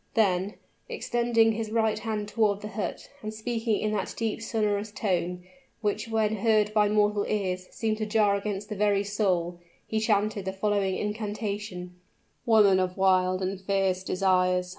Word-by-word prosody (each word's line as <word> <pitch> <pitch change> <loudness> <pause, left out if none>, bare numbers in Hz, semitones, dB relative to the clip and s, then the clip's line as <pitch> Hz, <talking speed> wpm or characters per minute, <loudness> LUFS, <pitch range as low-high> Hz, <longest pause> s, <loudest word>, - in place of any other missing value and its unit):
Then, 195 -2 +2 0.3
extending 235 -2 +2
his 220 0 -3
right 220 -1 +1
hand 215 -2 -3
toward 210 -2 +1
the 210 - -6
hut, 210 0 -4
and 215 - -4
speaking 225 0 -1
in 215 - -1
that 210 -2 -2
deep 225 -1 -2
sonorous 210 -2 -1
tone, 180 -4 -1 0.4
which 210 +1 -1
when 220 -1 0
heard 215 0 +2
by 210 -1 +4
mortal 210 -1 +2
ears, 185 -3 -2
seemed 220 -1 -2
to 215 - -2
jar 210 -1 +3
against 200 0 -4
the 210 - -4
very 205 0 +2
soul, 185 -4 0 0.3
he 220 - -1
chanted 210 -2 +1
the 190 - -2
following 195 -1 0
incantation: 210 -4 -4 0.5
"Woman 210 -4 +6
of 185 0 -1
wild 185 -1 +3
and 190 +1 -3
fierce 190 -1 0
desires! 185 -1 +1
205 Hz, 160 wpm, -27 LUFS, 190-215 Hz, 0.5 s, Woman